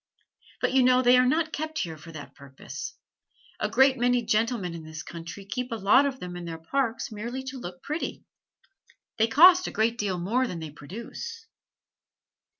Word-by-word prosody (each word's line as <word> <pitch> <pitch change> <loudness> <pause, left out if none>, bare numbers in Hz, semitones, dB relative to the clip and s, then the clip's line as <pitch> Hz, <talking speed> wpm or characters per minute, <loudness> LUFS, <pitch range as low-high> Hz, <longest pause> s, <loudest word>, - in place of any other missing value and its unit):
But - - +1
you 265 - +5
know 255 0 +4
they 245 0 +6
are 250 0 +5
not 315 +3 +1
kept 315 +1 -4
here 165 - -2
for 155 +2 -12
that 155 -3 -10
purpose. 140 -2 -9 0.6
A - - 0
great 265 -1 +4
many 245 0 +2
gentlemen 215 -4 0
in 165 -1 -8
this 155 +1 -8
country 170 +4 -9
keep 250 +5 -4
a - - -1
lot 225 +7 +4
of 265 -1 -5
them 180 -3 -7
in 175 -1 -6
their 165 -1 -5
parks 230 +9 -2
merely 235 +5 -5
to 265 0 -7
look 180 -5 -8
pretty. 305 +3 -4 1.0
They 225 - +4
cost 355 +9 +7
a - - -4
great 230 +2 0
deal 195 -3 -1
more 230 +9 0
than 180 - -5
they 160 -2 -7
produce." 235 - -8
230 Hz, 185 wpm, -27 LUFS, 175-260 Hz, 1.0 s, cost